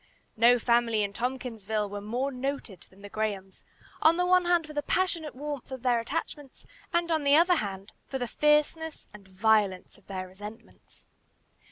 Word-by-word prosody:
No 240 +2 +6
family 235 -2 +2
in 200 -1 -3
Tompkinsville 225 -4 -3
were 205 0 -6
more 245 +7 -2
noted 255 -7 -5
than 195 +2 -19
the - - -7
Grahams, 200 -3 -4 0.4
on 325 +2 +5
the 360 - +2
one 365 0 +4
hand 345 -2 +3
for 305 - -10
the 295 - -1
passionate 335 -2 -1
warmth 285 -1 -6
of 260 -2 -7
their 245 -2 +3
attachments, 285 +2 -5 0.3
and 340 -1 +1
on 315 -2 +1
the 280 0 +5
other 225 - +2 0.2
for 265 - -3
the 245 -2 -3
fierceness 300 +4 +1
and 205 -2 -14
violence 200 -1 +1
of 200 - -30
their 185 -1 -5
resentments. 210 +5 -13
245 Hz, 170 wpm, -28 LUFS, 210-300 Hz, 0.4 s, No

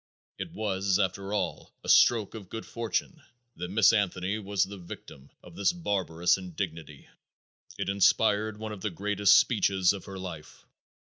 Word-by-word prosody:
It - - -5
was, 100 -2 0
after 100 0 -2
all, 105 - -3
a - - -10
stroke 110 -5 +5
of 100 -5 -9
good 110 - -6
fortune 115 +8 -3 0.4
that 90 +1 -5
Miss 105 +2 +5
Anthony 100 0 0
was 100 -1 0
the 100 +1 -7
victim 70 -5 -11
of - - -14
this 100 - +2
barbarous 95 - 0
indignity. 85 -5 -6 0.7
It - - -3
inspired 105 +2 +2
one 110 0 -6
of 105 -3 -8
the 105 - -1
greatest 100 +2 +3
speeches 100 -5 +3
of 100 - -8
her 95 -1 -8
life. 90 -5 -9
100 Hz, 155 wpm, -28 LUFS, 90-105 Hz, 0.7 s, stroke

